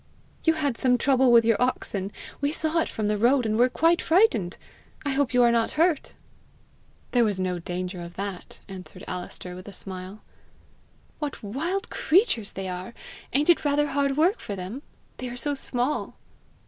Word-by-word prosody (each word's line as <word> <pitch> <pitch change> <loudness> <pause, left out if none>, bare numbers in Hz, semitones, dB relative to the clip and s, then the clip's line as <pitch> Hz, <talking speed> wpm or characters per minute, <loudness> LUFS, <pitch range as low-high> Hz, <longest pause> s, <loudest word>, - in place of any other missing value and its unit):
"You 325 - +5
had 285 -6 -1
some 250 -1 +3
trouble 265 -1 +4
with 230 -1 +7
your 230 0 +3
oxen! 205 -6 -1 0.3
We 285 0 +1
saw 315 +1 0
it - - 0
from 215 - -3
the 210 0 +1
road, 245 +3 +4
and 215 -1 +1
were 245 +3 +4
quite 330 +6 +3
frightened. 320 - +3 0.5
I 285 - +1
hope 270 -1 +1
you 250 -1 +4
are 235 - +5
not 230 -1 +1
hurt." 325 -2 +2 1.0
"There 245 -1 +4
was 205 -4 0
no 180 -1 -1
danger 180 +1 -4
of 170 0 -9
that," 195 -2 -6
answered 185 -1 -9
Alister 180 0 -6
with 185 +2 -10
a 205 - -8
smile. 190 +2 -6 1.0
"What 295 -6 -4
wild 320 - -3
creatures 310 - +2
they 195 -1 -4
are! 185 +5 -6 0.4
Ain't 295 +6 +5
it 340 - +1
rather 295 0 +2
hard 280 0 0
work 350 +8 +3
for 205 - -5
them? 190 +8 -6 0.4
They 250 - -5
are 240 - -7
so 290 +4 0
small!" 265 0 -2
245 Hz, 180 wpm, -26 LUFS, 195-285 Hz, 1.0 s, with